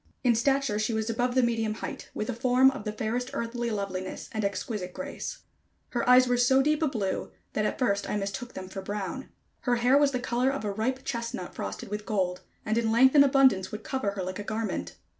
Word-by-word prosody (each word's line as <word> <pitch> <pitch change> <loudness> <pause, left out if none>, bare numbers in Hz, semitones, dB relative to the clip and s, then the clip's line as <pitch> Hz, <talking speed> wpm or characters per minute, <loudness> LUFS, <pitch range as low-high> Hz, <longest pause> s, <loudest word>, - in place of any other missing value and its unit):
In 245 -2 +5
stature 270 -1 +1
she 215 +1 0
was 220 +1 -1
above 245 +2 0
the 255 - +4
medium 225 -2 0
height, - - -6
with 215 - -2
a 250 - -1
form 255 +3 +4
of 270 -5 -8
the 210 - -1
fairest 230 +4 -2
earthly 235 +1 -2
loveliness 195 -3 -4
and 215 -1 -2
exquisite 200 -2 -3
grace. 280 - -6 0.5
Her 240 0 -1
eyes 250 0 +7
were 245 0 +2
so 265 +2 +4
deep 305 +2 +1
a 315 - +3
blue, 205 -8 -2 0.2
that 215 - 0
at - - -3
first 200 -6 0
I - - 0
mistook 200 +5 -4
them 185 - -6
for 195 +1 -6
brown. 205 +5 -4 0.3
Her 245 -1 +1
hair 250 +4 +4
was 290 -1 +4
the 255 -2 -2
color 245 +1 +1
of 275 -5 -3
a 205 - 0
ripe 255 +6 -2
chestnut 230 -5 -4
frosted 95 - -5
with 210 +1 -5
gold, 185 -3 0 0.2
and 220 +2 +1
in 225 -1 0
length 260 +3 +6
and 285 -2 +8
abundance 265 -9 +4
would 215 0 -6
cover 260 -7 -2
her 195 -2 -3
like 185 +2 -5
a - - -4
garment. 210 - -3
230 Hz, 225 wpm, -28 LUFS, 205-255 Hz, 0.5 s, and